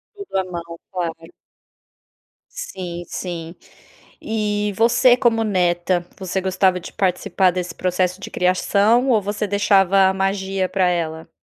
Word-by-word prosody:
Tudo 400 - -5
a 190 - +1
mão, 170 -2 -8
claro. 175 -3 -2 1.4
Sim, 180 - -6
sim, 170 -2 -6 0.7
e 210 -1 -1
você 240 +2 +5
como 230 -3 +2
neta, 175 -3 +1
você 190 0 -2
gostava 185 -1 +1
de - - -10
participar 185 -1 +1
desse 180 -2 -4
processo 185 +1 -1
de - - -7
criação 205 +7 +2
ou 225 -4 +4
você 205 +1 -3
deixava 195 -1 +3
a 190 - +2
magia 195 -1 -1
pra 190 -2 +1
ela? 160 -2 -2
190 Hz, 130 wpm, -21 LUFS, 180-205 Hz, 1.4 s, você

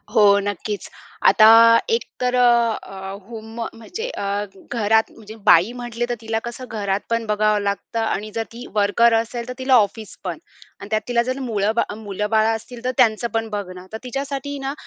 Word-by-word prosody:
हो. 215 - +6 0.2
नक्कीच. 205 +1 -4 0.4
आता 215 - +7 0.4
एक 460 +1 +1 0.2
तर 250 0 0
अ, 235 -2 +4
अ, 190 0 -8 0.2
होम 225 -1 -9 0.2
म्हणजे 355 - -6
अ, - - -5 0.5
घरात 220 -1 +2
म्हणजे 220 0 -12
बाई 175 +8 +6
म्हटले 240 -1 -3
तर 240 - -1
तिला 225 0 -2
कसं 240 +2 -6
घरातपण 215 +2 -2
बघावं 210 0 +2
लागतं 200 +3 -3
आणि 215 -1 -2
जर 225 - 0
ती 245 +2 -9
वर्कर 215 +3 +4
असेल 230 +1 -2
तर 250 - -5
तिला 260 0 +3
ऑफिसपण 205 -5 -1 0.4
आणि 200 - -9
त्यात 215 0 +1
तिला 240 -1 +2
जर 255 +2 -3
मुळं, 215 -5 0 0.3
मुलं-बाळ 210 +1 0
असतील 235 +2 -9
तर 255 - +1
त्यांचंपण 225 -2 +2
बघणं. 185 -3 -6
तर - - -3
तिच्यासाठी 275 +2 -4
ना 270 +1 -3
225 Hz, 165 wpm, -21 LUFS, 210-240 Hz, 0.5 s, आता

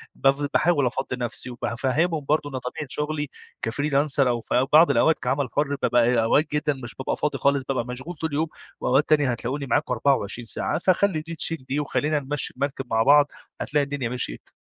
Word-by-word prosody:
بف 140 +1 +2
باحاول 155 -4 +3
أفضّي 130 +1 -3
نفسي 120 +1 -4
وبافهمهم 140 +6 -1
برضه 150 -1 +1
إن 130 -2 -4
طبيعة 140 +4 -6
شغلي 150 -1 -2 0.3
كفريلانسر 140 +2 +1
أو 120 -1 0
في 125 +3 +1
بعض 160 0 +7
الأوقات 140 +5 +3
كعمل 135 0 -1
حُر 145 -1 +1
بابقى 120 -1 +3
أوقات 145 +7 +3
جدًا 150 0 +1
مش 120 - -7
بابقى 130 - -2
فاضي 150 - -1
خالص، 140 -1 +2
بابقى 130 -4 0
مشغول 130 +8 -6
طول 160 +2 -3
اليوم 150 +3 0 0.3
وأوقات 140 +5 +2
تانية 145 -4 +4
هتلاقوني 130 +4 -3
معاكم 125 - +1
24 120 -2 0
ساعة. 135 - -1
فخلّي 185 -3 +2
دي 165 +1 -7
تشيل 160 -4 -4
دي 140 +3 0
وخلّينا 150 +1 0
نمشّي 145 +1 -2
المركب 135 -1 -2
مع 115 0 +2
بعض 145 +2 +5 0.3
هتلاقي 145 +1 +1
الدنيا 140 -4 -3
مشيت. 125 - -4
140 Hz, 185 wpm, -24 LUFS, 125-150 Hz, 0.3 s, بعض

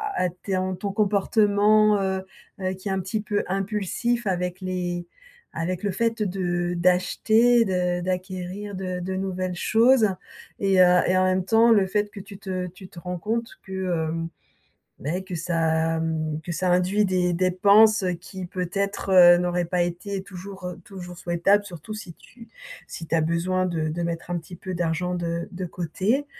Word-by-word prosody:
à 180 - +1
t 180 +3 -6
ton 185 0 0
ton 200 +2 -4
comportement, 210 0 +3
heu 190 -1 -1 0.4
heu, 185 0 -1
qui 190 +2 -6
est - - 0
un 190 - 0
petit 190 +4 -2
peu 205 -1 -1
impulsif 210 +4 -1
avec 180 0 -2
les 175 -1 -3 0.5
avec 175 +2 -3
le 205 - -1
fait 230 +3 -1
de 175 -2 -1
d'acheter, 220 +7 +3
de 180 -1 0
d'acquérir 185 +2 -4
de 185 -1 -4
de 185 +1 -4
nouvelles 185 -1 -2
choses 225 +3 +4 0.5
et 195 -2 +3
heu 180 0 +6
et 185 +1 +3
en 185 - +4
même 185 0 +1
temps 225 +2 +5
le 200 -4 +4
fait 205 +1 -1
que 205 - -9
tu 200 0 -10
te 185 -3 -4
tu 185 +2 -12
te 170 - -11
rends 180 0 -5
compte 230 +5 -2
que, 190 - -13 0.4
hem, 165 0 -3 0.7
beh, 175 +7 -3
que 185 -2 -6
ça, 165 -1 0
mmh, 155 -1 -2
que 175 - -5
ça 180 +2 0
induit 185 +4 +3
des 180 -1 +1
dépenses 200 +4 +5 0.2
qui 190 -2 -8
peut-être, 195 +2 -3
heu, 175 -1 +9
n'auraient 175 0 0
pas 175 0 +1
été 190 +3 -4
toujours, 190 0 -9
heu, 180 0 -7
toujours 180 -3 -9
souhaitables 175 +4 +2
surtout 185 +2 -9
si 190 -6 -8
tu 235 -1 -16 0.4
si 165 - -7
tu - - -4
as 160 - +3
besoin 175 +3 0
de 160 -3 -1
de 170 +3 -3
mettre 170 0 -4
un 175 - 0
petit 175 +2 -11
peu 185 +1 -6
d'argent 175 +1 -1
de 170 -1 -3
de 180 0 -5
côté. 185 - -1
185 Hz, 180 wpm, -24 LUFS, 175-200 Hz, 0.7 s, heu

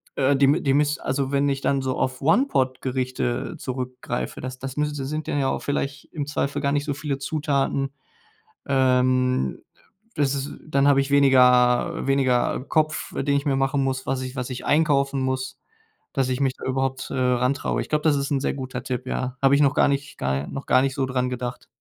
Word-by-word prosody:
äh, 140 +1 +3
die 140 0 +4
mi 150 +6 +3
die 135 -4 +2
miss 145 +1 +2
also 135 0 -2
wenn 140 0 +2
ich 135 -1 -1
dann 140 -1 +1
so 130 -1 -2
auf 130 +1 -2
One-Pot-Gerichte 130 - 0
zurückgreife, 125 - -4
das 130 0 -6
das 135 0 -6
müssen 150 0 -1
das 135 -1 -4
sind 155 +2 -4
dann 145 - 0
ja 135 - +1
auch - - -2
vielleicht 140 0 -3
im 150 -3 -3
Zweifel 145 -1 -2
gar 140 -1 +1
nicht 145 -1 +1
so 145 -1 -2
viele 140 0 -3
Zutaten. 140 -2 -1 0.7
Ähm, 130 - +2 0.5
das 140 -2 +1
ist 140 +1 -5
dann 140 -2 +2
habe 140 -1 +5
ich 135 +1 -4
weniger 125 -3 +4
weniger 130 -3 +2
Kopf, 155 0 0
den 140 0 +1
ich 140 - -3
mir 140 -2 +2
machen 135 +1 +1
muss, 130 -1 -2
was 130 0 -1
ich 130 +1 -6
was 125 0 -3
ich 125 - -6
einkaufen 140 -3 +2
muss 130 0 -2 0.6
dass 135 -2 0
ich 130 +1 -2
mich 135 -2 +1
da - - -10
überhaupt, 130 0 -2
äh, - - -4
rantraue. 125 +1 +1
Ich - - -5
glaube, 150 0 0
das 150 -2 +3
ist 140 +1 -2
'n 140 - +1
sehr - - 0
guter 130 -2 -5
Tipp, 125 -1 -4
ja. 130 0 -3
Habe 135 0 +5
ich 140 - +3
noch 140 -1 +3
gar - - +4
nicht 140 0 -3
ga 65 +2 -1
noch 135 - -6
gar 130 - +4
nicht 135 0 0
so 135 - 0
dran 125 -1 -1
gedacht. 125 0 -5
135 Hz, 210 wpm, -24 LUFS, 130-140 Hz, 0.7 s, habe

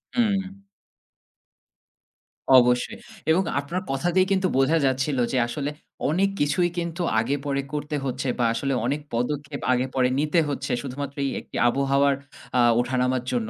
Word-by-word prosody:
হু। 195 -4 0 2.0
অবশ্যই। 125 0 +3 0.3
এবং 180 +4 +3 0.2
আপনার 170 +6 -3
কথা 135 +5 -1
দিয়ে 185 0 +5
কিন্তু 190 -1 +2
বোঝা 135 +5 +3
যাচ্ছিল 135 +1 0
যে 130 - 0
আসলে, 140 +4 -3 0.4
অনেক 190 +6 +2
কিছুই 150 +5 +2
কিন্তু 170 0 -3 0.2
আগে 125 +6 0
পরে 140 -1 0
করতে 150 0 -3
হচ্ছে। 130 0 -3
বা 120 - +3
আসলে 135 +4 -1
অনেক 145 +4 -1
পদক্ষেপ 140 +4 -2
আগে 125 +1 +1
পরে 125 -1 +3
নিতে 155 +3 +2
হচ্ছে 145 - -3
শুধুমাত্র 140 +1 -5
এই 135 - -1
একটি - - -15
আবহাওয়ার 140 +2 +2 0.4
আ - - +4 0.2
ওঠানামার 125 0 0
জন্য। 115 -3 -1
140 Hz, 145 wpm, -24 LUFS, 130-160 Hz, 2.0 s, দিয়ে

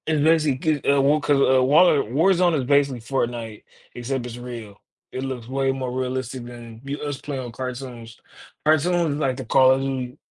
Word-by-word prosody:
It's 155 -2 +1
basically 155 -2 +2
g - - -1
uh, 140 0 +4
well, 145 +3 +3
'cause, 145 -1 +2
uh, 130 -1 +4
War 145 +7 +6 0.2
Warzone 170 - +2
is 135 - -1
basically 140 -2 +2
Fortnite, 115 -3 -3 0.3
except 125 +1 -4
it's 120 -1 -7
real. 115 -4 -9 0.3
It 130 - -5
looks 130 -4 -5
way 135 +1 0
more 130 -2 -4
realistic 130 0 -3
than 120 -2 -11
you 140 +1 -5
us 145 -2 -4
playing 135 -3 -5
on 120 - -7
cartoons, 125 -2 -7 0.5
cartoons 160 +1 +2
is 145 - -4
like 130 -4 0
the 130 - -6
Call 130 +3 +5
of 135 - -1
Duty 130 -1 -4
130 Hz, 190 wpm, -23 LUFS, 125-145 Hz, 0.5 s, War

